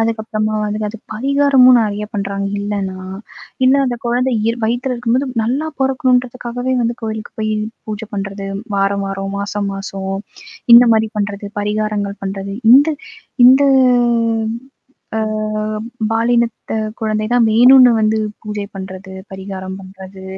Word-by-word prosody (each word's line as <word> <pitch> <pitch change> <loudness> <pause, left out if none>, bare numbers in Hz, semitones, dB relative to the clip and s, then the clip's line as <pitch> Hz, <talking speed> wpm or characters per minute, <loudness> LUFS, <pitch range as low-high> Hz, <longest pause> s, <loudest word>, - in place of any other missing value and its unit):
அதுக்கப்பறமா 220 -1 -1
வந்து, 210 0 -3
அது 225 +2 -8 0.2
பரிகாரமும் 270 0 +4
நெறைய 210 -1 -2
பண்ணுறாங்க 200 0 -2
இல்லன்னா, 200 -2 -3 0.7
இல்ல 260 - +5
அந்த 245 -1 -2
குழந்தை 250 +2 +1
இயற் 230 +1 -1
வயித்துல 245 +3 -1
இருக்கும்போது 245 +3 0
நல்லா 265 +8 -1
பொறக்கணுன்றதுக்காகவே 255 -2 0
வந்து 235 0 -1
கோயிலுக்கு 220 -1 -5
போய் 215 0 -1 0.4
பூஜை 215 0 -5
பண்றது 195 0 -5 0.3
வார 195 0 +2
வாரம், 195 0 -4
மாச 200 +1 -3
மாசம். 195 0 -5 0.6
இந்த 240 +1 +9
மாதிரி 220 0 +1
பண்ணுறது, 205 0 -3
பரிகாரங்கள் 210 -1 -2
பண்றது. 195 0 -5 0.2
இந்த 280 +4 +7 0.6
இந்த 260 +3 +7 1.5
அ - - +1 0.9
பாலினத்த 235 0 0 0.3
குழந்தை 215 -1 -1
தான் 245 -1 +4
வேணும்ன்னு 250 +3 +7
வந்து 220 0 +1 0.2
பூஜை 210 -2 -4
பண்றது, 190 0 -8 0.2
பரிகாரம் 190 -1 -7
பண்றது, 190 0 -12
215 Hz, 120 wpm, -17 LUFS, 200-245 Hz, 1.5 s, இந்த